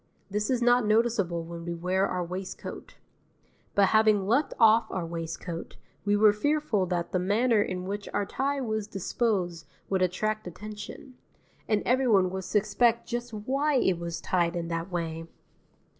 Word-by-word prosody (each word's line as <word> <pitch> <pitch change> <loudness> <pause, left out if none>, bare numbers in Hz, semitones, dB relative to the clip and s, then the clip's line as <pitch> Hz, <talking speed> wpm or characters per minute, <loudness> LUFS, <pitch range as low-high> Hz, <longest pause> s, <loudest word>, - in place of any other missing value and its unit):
This 210 +1 -1
is 250 -2 +1
not 245 0 +5
noticeable 215 -6 +1
when 170 0 -8
we 170 0 -4
wear 185 +3 +1
our 180 -1 -2
waistcoat; 185 +2 -7 0.8
but 200 -1 +5
having 215 -3 +4
left 245 +9 +2
off 225 0 +5
our 185 -3 -3
waistcoat, 165 0 -6 0.3
we 205 0 +3
were 210 0 +6
fearful 235 -4 0
that 175 -1 -2
the 185 - +1
manner 215 +4 +2
in 185 -2 -3
which 200 +1 -4
our 205 - 0
tie 280 +6 -1
was 220 -4 -2
disposed 190 -4 -1 0.2
would 190 -1 +1
attract 215 +3 0
attention; 215 - -9 0.5
and 210 -1 +1
everyone 235 -8 +3
would 190 -1 -4
suspect 220 +4 +2
just 240 0 -4
why 270 +8 0
it 190 -9 +2
was 170 -1 -4
tied 175 -1 0
in 170 -1 -3
that 165 +2 -3
way. 165 -1 -3
205 Hz, 160 wpm, -28 LUFS, 180-225 Hz, 0.8 s, were